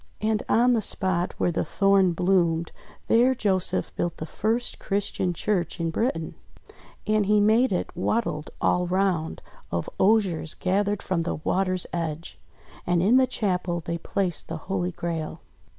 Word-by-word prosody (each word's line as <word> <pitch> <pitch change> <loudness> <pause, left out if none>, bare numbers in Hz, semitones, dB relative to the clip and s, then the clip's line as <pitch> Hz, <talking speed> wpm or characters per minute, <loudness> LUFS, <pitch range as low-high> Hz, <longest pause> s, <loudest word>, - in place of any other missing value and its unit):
And 215 0 0
on 245 +2 +4
the 225 - +2
spot 185 -3 +1
where 175 - +1
the 170 - -1
Thorn 195 -3 +3
bloomed, 170 -2 +1 0.4
there 250 +3 +4
Joseph 190 -5 -1
built 175 -1 -2
the 155 - -5
first 225 +8 -1
Christian 195 -2 -1
church 180 0 -1
in 165 -1 -1
Britain. 165 -5 -1 0.7
And 215 -2 +1
he 210 0 +4
made 220 +4 +4
it 180 - -2
"wattled 180 -4 -1
all 180 0 +1
round" 180 -3 0 0.3
of 85 0 -2
osiers 190 -6 +2
gathered 200 +2 0
from 185 -3 -1
the 165 - -2
water's 185 +3 0
edge. 165 -1 -4 0.5
And 175 -1 +2
in 225 +7 +5
the 260 0 +4
chapel 180 -7 -1
they 170 0 -3
placed 180 -1 -1
the 165 - -4
Holy 180 +1 -2
Grail. 165 -2 -4
185 Hz, 150 wpm, -25 LUFS, 170-210 Hz, 0.7 s, in